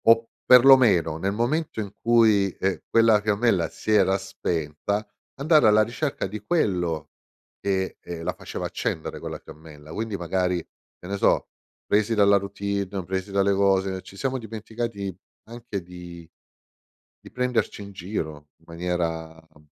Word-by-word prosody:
O 115 Hz, 0 st, +5 dB, 0.2 s
perlomeno, 120 Hz, -, +6 dB
nel 95 Hz, +4 st, -1 dB
momento 120 Hz, +6 st, -1 dB
in 100 Hz, -2 st, -4 dB
cui, 110 Hz, -4 st, +4 dB
ehm, 95 Hz, 0 st, 0 dB
quella 115 Hz, -2 st, +5 dB
fiammella 105 Hz, -4 st, +1 dB
si -, -, -5 dB
era 95 Hz, -2 st, +4 dB
spenta, 95 Hz, +1 st, -3 dB, 0.3 s
andare 150 Hz, -1 st, +4 dB
alla 110 Hz, 0 st, +6 dB
ricerca 135 Hz, +6 st, -3 dB
di 105 Hz, +3 st, -5 dB
quello 90 Hz, -, 0 dB, 0.5 s
che, 95 Hz, -1 st, -1 dB
ehm, 85 Hz, -1 st, -7 dB
la 90 Hz, +1 st, -1 dB
faceva -, -, -6 dB
accendere 80 Hz, -, -3 dB
quella -, -, -6 dB
fiammella. 75 Hz, -1 st, -12 dB
Quindi, 110 Hz, 0 st, -3 dB
magari, 90 Hz, +1 st, 0 dB
che 85 Hz, +1 st, -13 dB
ne 100 Hz, +1 st, -3 dB
so, -, -, +2 dB, 0.4 s
presi 105 Hz, +2 st, +2 dB
dalla 100 Hz, -1 st, +5 dB
routine, 100 Hz, -1 st, -3 dB
presi 95 Hz, +2 st, -3 dB
dalle 100 Hz, 0 st, +2 dB
cose, 95 Hz, -1 st, +1 dB
ci 95 Hz, -, -14 dB
siamo 130 Hz, +3 st, -1 dB
dimenticati 110 Hz, -3 st, -5 dB, 0.3 s
anche 115 Hz, -4 st, -6 dB
di 85 Hz, -1 st, -11 dB, 1.0 s
di -, -, -13 dB
prenderci 125 Hz, -5 st, -1 dB
in 100 Hz, 0 st, -10 dB
giro 80 Hz, -6 st, -5 dB
in 80 Hz, -, -28 dB
maniera, 85 Hz, -1 st, -3 dB, 0.2 s
uhm 75 Hz, 0 st, -21 dB
100 Hz, 145 wpm, -25 LUFS, 90-110 Hz, 1.0 s, perlomeno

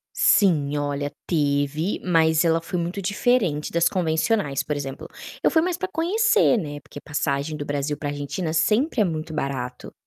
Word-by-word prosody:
Sim, 150 Hz, -7 st, +3 dB
olha, 145 Hz, 0 st, -2 dB
teve, 145 Hz, +2 st, 0 dB
mas 160 Hz, -2 st, +3 dB
ela 165 Hz, 0 st, +3 dB
foi 175 Hz, +2 st, -4 dB
muito 175 Hz, +4 st, -3 dB
diferente 200 Hz, -, +1 dB
das 170 Hz, 0 st, +3 dB
convencionais, 160 Hz, -, 0 dB
por 150 Hz, -, -3 dB
exemplo, 135 Hz, -1 st, -6 dB, 0.4 s
eu -, -, +5 dB
fui 320 Hz, -1 st, +3 dB
mais 355 Hz, -1 st, -1 dB
pra 375 Hz, 0 st, -3 dB
conhecer, 410 Hz, -, +3 dB
né, 145 Hz, -7 st, -4 dB
porque 145 Hz, -, -11 dB
passagem 145 Hz, 0 st, -2 dB
do 145 Hz, -, -5 dB
Brasil 145 Hz, +1 st, -2 dB
pra 145 Hz, 0 st, -4 dB
Argentina 145 Hz, +4 st, -3 dB
sempre 215 Hz, -, +2 dB
é 210 Hz, -, +5 dB
muito 160 Hz, -2 st, -3 dB
barato. 135 Hz, -4 st, -4 dB
160 Hz, 165 wpm, -23 LUFS, 145-195 Hz, 0.4 s, eu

